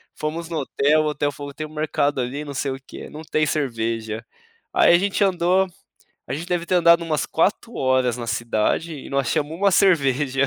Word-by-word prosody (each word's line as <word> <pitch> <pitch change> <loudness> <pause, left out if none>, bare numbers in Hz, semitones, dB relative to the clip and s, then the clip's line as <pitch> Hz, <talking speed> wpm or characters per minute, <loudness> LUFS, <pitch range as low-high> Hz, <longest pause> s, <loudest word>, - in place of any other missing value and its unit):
fomos 160 +2 -4
no 165 -2 -2
hotel, 145 +2 +2
o - - -1
hotel 145 -1 -1
falou: 145 0 -8
"Tem 155 +1 -5
mercado 150 -2 -1
ali, 130 +4 -4
não 145 - -6
sei 140 0 -2
o 130 - -5
quê, - - -9
não 155 - -9
tem 155 0 +1
cerveja". 115 -6 -2 0.5
Aí - - +5
a - - +7
gente 200 +2 -1
andou 185 0 +2 0.6
a - - -3
gente 165 +4 -6
deve 175 -1 -1
ter 185 - 0
andado 170 -1 +5
umas 155 -2 0
4 210 +7 0
horas 130 -2 +1
na 120 -1 -6
cidade 115 +8 0
e 140 - -9
não 140 - -1
achamos 145 +3 0
uma 200 +2 +3
cerveja, 140 -8 +3
150 Hz, 200 wpm, -22 LUFS, 135-170 Hz, 0.6 s, a